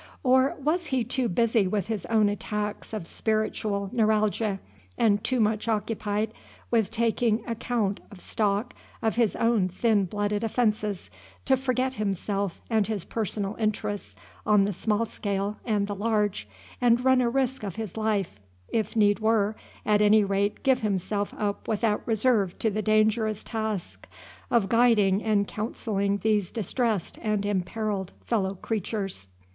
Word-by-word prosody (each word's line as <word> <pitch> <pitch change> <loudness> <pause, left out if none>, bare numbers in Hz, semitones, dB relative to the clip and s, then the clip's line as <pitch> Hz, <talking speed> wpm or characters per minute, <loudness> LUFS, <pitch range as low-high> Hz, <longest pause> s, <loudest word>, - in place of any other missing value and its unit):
or 260 0 +4
was 315 +5 0
he 260 -4 +1
too 245 +1 -1
busy 225 +1 +2
with 200 -1 -1
his 210 -6 -4
own 220 -2 +3
attacks 210 0 -3
of 215 -6 -4
spiritual 215 -1 -1
neuralgia, 215 -2 +1 0.4
and 205 -2 +3
too 255 -1 +1
much 215 0 +1
occupied 215 0 -1 0.4
with 225 -4 +2
taking 230 0 +1
account 230 -3 -1
of 200 - -12
stock 210 +4 -1 0.3
of 220 - +2
his 230 -3 +2
own 230 -5 +2
thin 205 +2 +2
blooded 205 +3 -1
offences, 215 -4 -1 0.3
to 265 - +4
forget 260 0 0
himself 200 -3 -2
and 220 -3 +1
his 210 -5 -3
personal 210 -2 -2
interests 210 -2 -2 0.3
on 210 -2 +4
the 205 - -1
small 215 +4 0
scale 200 -1 -3
and 210 -3 +1
the 205 - -4
large, 205 - 0 0.3
and 240 +1 +3
run 260 -1 +5
a 240 - +2
risk 265 +1 0
of 200 -5 -5
his 220 -5 -5
life, 210 - -1 0.3
if 220 -1 -1
need 205 -1 +4
were, 220 -1 +2 0.3
at 210 -1 +3
any 210 0 +6
rate 200 +1 0
give 265 -2 +3
himself 205 0 -1
up 205 -1 -2
without 215 -1 +1
reserve 220 -4 +2
to 220 - 0
the 215 +2 -1
dangerous 215 0 +2
task 220 -5 -4 0.4
of 230 -5 +3
guiding 215 -4 +4
and 210 -2 +1
counselling 205 -2 -1
these 210 -4 +2
distressed 225 -2 -2
and 210 -2 0
imperilled 200 0 -2
fellow 195 -4 0
creatures? 195 - -3
215 Hz, 150 wpm, -27 LUFS, 200-230 Hz, 0.4 s, any